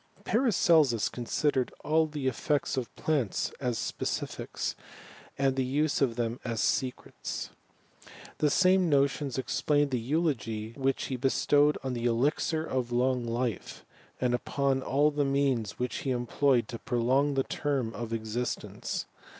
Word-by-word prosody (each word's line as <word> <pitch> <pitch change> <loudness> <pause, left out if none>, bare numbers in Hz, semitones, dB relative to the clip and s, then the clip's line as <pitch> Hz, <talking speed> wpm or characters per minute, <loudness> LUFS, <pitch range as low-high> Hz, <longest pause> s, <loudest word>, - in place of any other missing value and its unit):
Paracelsus 165 - +3
considered 130 +2 0
all 160 +2 +3
the 150 -3 -5
effects 135 +3 0
of 130 -3 -3
plants 140 -11 0
as 125 -4 -1
specifics, - - -3 0.6
and 135 -1 +2
the 135 - +1
use 145 +4 0
of 125 -4 +2
them 120 0 -2
as 115 -2 -3
secrets. 130 -2 -2 0.9
The 150 - +3
same 185 +3 +4
Bottons 140 -1 +1
explain 145 +3 +1
the 125 -2 0
eulogy 115 -6 -1
which 135 +2 -1
he 130 - -3
bestowed 145 +3 +3
on 130 -1 -2
the 120 0 -1
^ixiroflong 125 -2 0
life, 120 -3 -3 0.3
and 125 -1 +1
upon 135 +2 0
all 145 +3 +2
the 145 0 0
means 135 -6 0
which 125 0 -2
he 155 -6 -3
employed 125 0 +2
to 115 - -6
prolong 130 +4 +1
the 135 - +2
term 135 -7 -2
of 115 -1 -5
existence. 115 +2 -3
130 Hz, 135 wpm, -29 LUFS, 120-145 Hz, 0.9 s, same